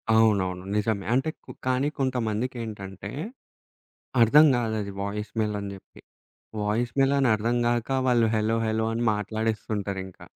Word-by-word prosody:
అవునవును. 95 -5 +3
నిజమే. 105 -2 0
అంటే 135 +5 +2 0.2
క్ - - -47 0.2
కానీ 130 +2 +2
కొంతమందికేంటంటే 110 -5 -3 1.1
అర్థం 150 +8 +7
కాదు 115 -2 -1
అది 100 -1 -5
వాయిస్ 105 +1 -4
మెయిల్ 105 -1 0
అని 100 - -5
చెప్పి. 95 - -16 0.6
వాయిస్ 115 +4 0
మెయిల్ 135 +1 +4
అని 135 -3 +3
అర్థం 115 +3 0
కాక 120 0 0 0.2
వాళ్ళు 120 -2 +4
హలో 110 +1 +1
హలో 110 0 0
అని 115 +1 -1
మాట్లాడేస్తుంటారింకా. 105 -3 -3
110 Hz, 135 wpm, -26 LUFS, 105-120 Hz, 1.1 s, అర్థం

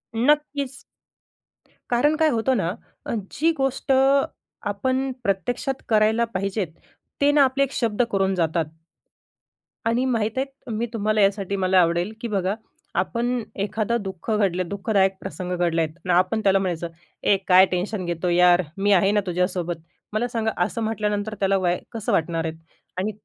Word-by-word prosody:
नक्कीच. 280 +1 +1 1.1
कारण 290 +6 +3
काय 315 0 +3
होतं 240 +3 +1
ना, 170 -5 0 0.4
अ, - - -3 0.2
जी 325 +3 +3
गोष्ट 270 0 -1 0.8
आपण 260 +6 -1
प्रत्यक्षात 245 +7 -1
करायला 220 +1 +3
पाहिजे, 195 +1 -1 0.6
ते 285 +1 +5
ना 290 -1 +5
आपले 265 +1 +1
एक 275 - -2
शब्द 225 -2 0
करून 195 -1 +1
जातात. 165 -1 +1 1.2
आणि 235 +3 +2
माहीत 225 -2 0
आहे, 270 -2 -4
मी 225 +2 -1
तुम्हाला 215 -1 +1
यासाठी 195 0 +1
मला 190 -1 +3
आवडेल 175 +4 +1
की 235 - -2
बघा, 195 -2 0 0.4
आपण 240 +5 0 0.2
एखादा 215 +3 0
दुःख 195 -2 -7
घडलं, 185 -4 +1
दुःखदायक 200 -1 +1
प्रसंग 180 -1 -4
घडले 170 -1 +1
आहेत 155 -1 -2
आणि 180 - +2
आपण 185 +5 +2
त्याला 195 0 +4
म्हणायचं, 175 -3 -2 0.4
“ए, 200 - +4
काय 185 0 +8
टेन्शन 185 +2 -2
घेतो 175 +1 -1
यार, 180 +1 +5 0.2
मी 200 +1 +2
आहे 195 +1 +4
ना 210 - +3
तुझ्यासोबत." 180 -1 -1 0.4
मला 220 +3 0
सांगा, 225 -2 -1
असं 230 - -4
म्हटल्यानंतर, 210 -1 -1
त्याला 195 0 +2
वाय 180 -2 +1
कसं 225 -3 -3
वाटणार 165 0 0
आहे? 160 - -2 0.4
आणि 205 +4 -1
205 Hz, 155 wpm, -23 LUFS, 185-235 Hz, 1.2 s, काय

